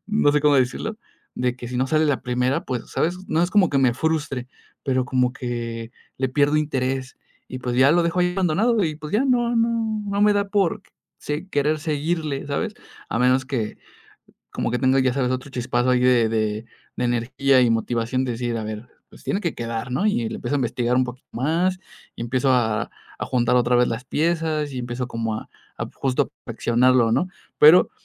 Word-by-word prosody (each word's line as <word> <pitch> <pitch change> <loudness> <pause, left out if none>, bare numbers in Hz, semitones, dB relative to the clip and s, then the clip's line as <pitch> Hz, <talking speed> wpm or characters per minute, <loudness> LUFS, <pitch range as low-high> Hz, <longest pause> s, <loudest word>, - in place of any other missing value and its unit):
no 210 -8 +3
sé, 150 - +3
cómo 145 -1 +4
decirlo, 135 - 0 0.4
de 125 0 -1
que 120 - -8
si 125 - -4
no 130 +2 +1
sale 155 +1 +3
la 145 -4 0
primera, 125 +1 0
pues, 125 -3 -3
¿sabes?, 175 +3 0
no 165 +2 +1
es 175 - 0
como 200 -4 +4
que 140 - +2
me 130 -3 +3
frustre, 145 -4 -1 0.4
pero 130 -2 +1
como 125 0 +1
que 115 -3 -5 0.3
le 130 0 0
pierdo 145 +3 +2
interés. 135 -3 -1 0.3
Y 130 - -6
pues 125 -1 -2
ya 130 +3 +6
lo 175 0 +4
dejo 170 +2 0
ahí 180 0 +2
abandonado, 195 +4 +2
y 155 - -1
pues, 155 +2 -8
ya 235 +6 +2
no 240 -2 +2
no 230 +1 +3 0.4
no 200 +1 0
me 210 - +5
da 200 0 0
por 200 -1 +1 0.4
si 150 +6 -4
querer 150 +1 +1
seguirle, 155 -2 -2
¿sabes? 140 - -2 0.3
A 115 - -1
menos 130 +1 +3
que 115 -7 -3 0.7
como - - -2
que 125 - 0
tengo, 130 +2 +3
ya 130 -1 +2
sabes, 130 -2 0
otro 130 +2 -4
chispazo 125 0 0
ahí 125 - +4
de 125 -3 +4
de 110 0 -1 0.3
de 125 - -1
energía, 130 +3 +2
y 120 - +3
motivación 115 +3 0
de 125 - -2
decir: 120 0 -2
"A 110 - -4
ver, 110 +3 -6 0.2
pues - - -16
tiene 200 - -1
que 170 - -2
quedar, 115 +1 -4
¿no?". 180 +11 +1
Y 120 - +1
le - - -6
empiezo 145 - -2
a - - 0
investigar 120 0 0
un 130 - +3
poquito 125 +1 -10
más, 170 +8 0 0.4
y - - -5
empiezo 130 +3 0
a 110 -4 +1 0.3
a - - -1
juntar 125 0 +1
otra 125 0 +3
vez 125 0 +4
las 115 +3 -4
piezas, 155 -1 0
y 130 - -4
empiezo 120 +1 -4
como 115 -2 -2
a - - -8 0.3
a - - -2
justo 130 -2 0 0.2
perfeccionarlo, 120 0 +3
¿no?, 180 - +1 0.3
pero 155 +4 +7
130 Hz, 210 wpm, -23 LUFS, 120-155 Hz, 0.7 s, pero